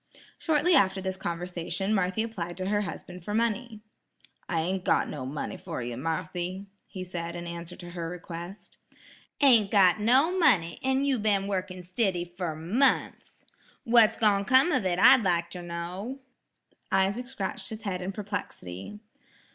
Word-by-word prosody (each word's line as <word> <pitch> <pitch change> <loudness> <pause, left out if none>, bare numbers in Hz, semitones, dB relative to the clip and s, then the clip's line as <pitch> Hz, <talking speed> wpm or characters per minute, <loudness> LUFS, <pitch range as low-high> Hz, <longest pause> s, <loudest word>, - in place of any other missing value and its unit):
Shortly 320 +2 +2
after 195 - +4
this 190 0 -3
conversation, 180 +2 -3
Marthy 190 +2 +1
applied 175 -7 -5
to 185 - -3
her 205 0 +1
husband 180 -2 -7
for 205 +4 -3
money. 230 0 -1 0.7
"I 165 - 0
ain't 185 +3 -2
got - - +2
no 130 -4 -5
money 150 +7 -4
fer 165 -8 -5
ye, 120 0 -4
Marthy," 175 +6 -3 0.2
he 185 - -7
said 170 -2 -5
in 175 0 -6
answer 170 0 -7
to 175 -1 -10
her 170 -2 -4
request. 175 +2 -9 0.6
"Ain't 235 -8 +6
got 195 -2 +5
no 265 - +4
money, 200 - +3
an' 265 +1 +1
you 270 -4 +1
been 205 -2 +1
wurkin' 185 -2 -3
stiddy 185 -1 0
fer 175 -2 -5
munfs! 215 - 0 0.4
What's 230 -2 +5
gone 205 -3 +3
come 260 - +5
of 255 -9 +1
it 175 -1 0
I'd 260 +6 +7
like 170 -3 0
ter 180 - -6
know." 180 +9 -6 0.7
Isaac 195 +6 +1
scratched 195 -6 -5
his 220 0 -7
head 185 -4 -3
in 185 +2 -3
perplexity. 195 - -6
190 Hz, 160 wpm, -28 LUFS, 175-220 Hz, 0.7 s, I'd